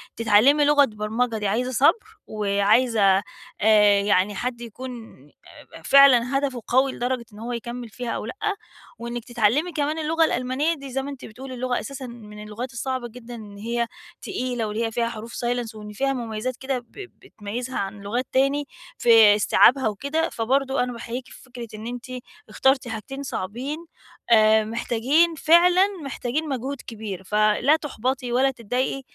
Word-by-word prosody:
تتعلّمي 230 +7 +4
لغة 290 -1 +5
برمجة 220 +1 -2
دي 210 - -2
عايزة 245 +6 -1
صبر 435 - +2
وعايزة 205 0 +3 0.4
آآ، 210 -1 +5
يعني 200 0 +2
حد 240 +2 -4
يكون 250 +3 -7 0.8
أب - - -13
فعلًا 270 -2 +6
هدفه 270 -4 -2
قوي 265 +2 +3
لدرجة 245 -1 -3
إن 210 - -12
هو 235 +2 -5
يكمّل 235 0 -6
فيها 245 +3 -6
أو - - -3
لأ، 230 - -6 0.6
وإنِّك 235 0 -5
تتعلّمي 240 +8 +1
كمان 305 0 -1
اللغة 320 +1 +2
الألمانية 260 +5 0
دي- 275 -4 -9
زي 270 +1 -1
ما 275 - -6
أنتِ 275 -2 -9
بتقولي- 260 +4 -9
اللغة 250 0 -1
أساسًا 275 -1 -7
من 210 -3 -11
اللغات 235 +5 -6
الصعبة 255 0 -3
جدًا 240 +1 -11
إن 210 -3 -11
هي 235 +2 -2 0.3
تقيلة، 250 - -3
واللي 215 +2 -2
هي 225 - -3
فيها 230 +1 -1
حروف 230 +1 -8
silence 240 -2 -3
وإن 210 -1 -9
فيها 270 +5 0
مميزات 235 0 -4
كده 265 -1 -2
ب 240 - -19
بتميّزها 250 - -7
عن 200 +1 -5
لغات 235 +6 -3
تاني 275 +2 +1 0.3
في 225 -3 +7
إستيعابها 250 +4 +4
وكده، 280 +10 -1
فبرضو 265 +4 0
أنا 250 0 0
باحييكِ 235 +2 -6
في - - -14
فكرة 245 -2 -9
إن 215 +2 -7
أنتِ 245 0 -6 0.4
اخترتِ 265 -1 +2
حاجتين 225 +5 -6
صعبين، 265 - -5 0.4
آآ، 220 -1 +5
محتاجين 245 +9 +1
فعلًا 350 +5 +5 0.2
محتاجين 280 +3 -3
مجهود 270 +1 -4
كبير. 210 -5 -6
فلا 215 +8 +3
تُحبَطي 260 -4 -3
ولا 265 +3 +3
تضايقي 250 +3 -2
245 Hz, 160 wpm, -24 LUFS, 220-270 Hz, 0.8 s, في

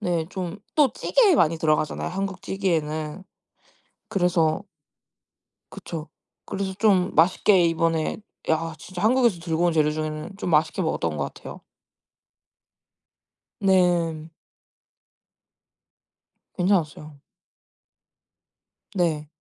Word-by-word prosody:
네. 170 -5 -1
좀 185 0 -5 0.2
또 285 -6 +4
찌개에 430 - +3
많이 165 - +3
들어가잖아요. 155 -1 0
한국 195 -1 -4
찌개에는. 160 -2 -2 0.9
그래서 175 -3 +1 1.1
그쵸. 160 -1 -7 0.4
그래서 190 -1 -3
좀 195 -4 +3
맛있게 180 +3 +4
이번에 165 -1 0 0.3
야 160 0 0
진짜 180 +3 -8
한국에서 235 -4 +3
들고 165 0 0
온 170 - +2
재료 150 -1 +3
중에는 155 +3 -5
좀 180 - -3
맛있게 160 +4 +2
먹었던 85 - -1
것 70 - -3
같아요. - - -10 2.0
네. 175 -5 +2 2.3
괜찮았어요. 155 -6 -1 1.8
네. 160 -5 0
170 Hz, 210 characters per minute, -24 LUFS, 155-190 Hz, 2.3 s, 또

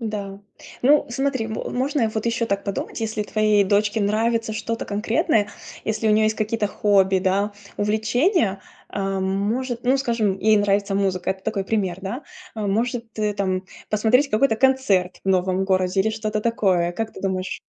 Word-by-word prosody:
Да. 205 -3 -4 0.4
Ну, 290 +3 +5
смотри, 260 -2 -1
мо 220 - -4
можно 260 -2 0
вот 220 +1 -3
еще 230 0 0
так 200 -2 -2
подумать: 200 +3 -4
если 220 -1 -2
твоей 215 -1 +2
дочке 210 +2 +1
нравится 225 +2 +1
что-то 230 +1 -3
конкретное, 210 0 +1 0.4
если 220 0 -1
у - - +4
нее 215 +1 +4
есть 215 0 +2
какие-то 215 0 0
хобби, 195 -2 +3
да, 195 +2 0 0.2
увлечения. 220 - +1 0.3
А, 195 -1 -2
может, 220 +6 -1
ну, 260 +2 +4
скажем, 230 -7 0
ей 215 +1 +4
нравится 200 0 +1
музыка- 190 -2 0
это 190 0 -4
такой 210 -3 -2
пример, 190 -4 -1
да. 220 +9 -5 0.3
Может, 225 +3 -1
ты 210 -1 0
там 190 -2 -1 0.3
посмотреть 230 +7 +3
какой-то 220 +2 +3
концерт 225 -9 +2
в - - -2
новом 185 0 +2
городе 185 0 +1
или 220 +3 +1
что-то 215 -1 -2
такое. 190 -6 +1
Как 225 +3 -4
ты - - -10
думаешь? 190 -1 -2
215 Hz, 165 wpm, -22 LUFS, 195-230 Hz, 0.4 s, Ну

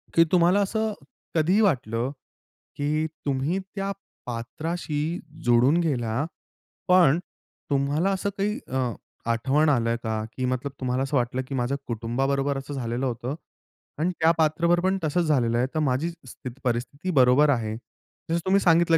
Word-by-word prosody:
की 165 - +8
तुम्हाला 180 +2 +5
असं 220 +2 0 0.4
कधी 170 +6 +3
वाटलं, 125 - +1 0.6
की 150 +2 0 0.2
तुम्ही 140 +6 0
त्या 195 +1 -4 0.3
पात्राशी 155 +7 -3 0.3
जोडून 120 +6 +5
गेला. 130 -4 0 0.6
पण 175 -4 +6 0.5
तुम्हाला 145 +5 +1
असं 195 +1 -1
काही 210 +5 0
अ, 130 - -2 0.5
आठवण 135 +7 +2
आल 120 -5 +2 0.2
का? 110 -1 -1
की 130 - 0
मतलब 130 +2 -1
तुम्हाला 130 0 0
असं 135 +1 0
वाटलं, 125 +1 0
की 135 - -4
माझ्या 130 +2 0
कुटुंबाबरोबर 135 +5 0
असं 135 +1 -6
झालेलं 125 -1 -2
होतं 125 +2 -3 0.6
आणि 170 +4 +1
त्या 160 +1 +5
पात्राबरोबर 170 +2 +3
पण 190 - +1
तसच 160 +3 +1
झालेलं 120 -6 +2
आहे. 125 +2 +2
तर - - +2
माझी 145 +2 +1 0.2
स्थित 130 +1 -8
परिस्थिती 130 +8 -2
बरोबर 130 +4 +6
आहे. 110 -5 0 0.5
जसं 170 +1 +1
तुम्ही 190 +1 +4
सांगितलं, 165 -1 +5
140 Hz, 145 wpm, -25 LUFS, 125-170 Hz, 0.6 s, की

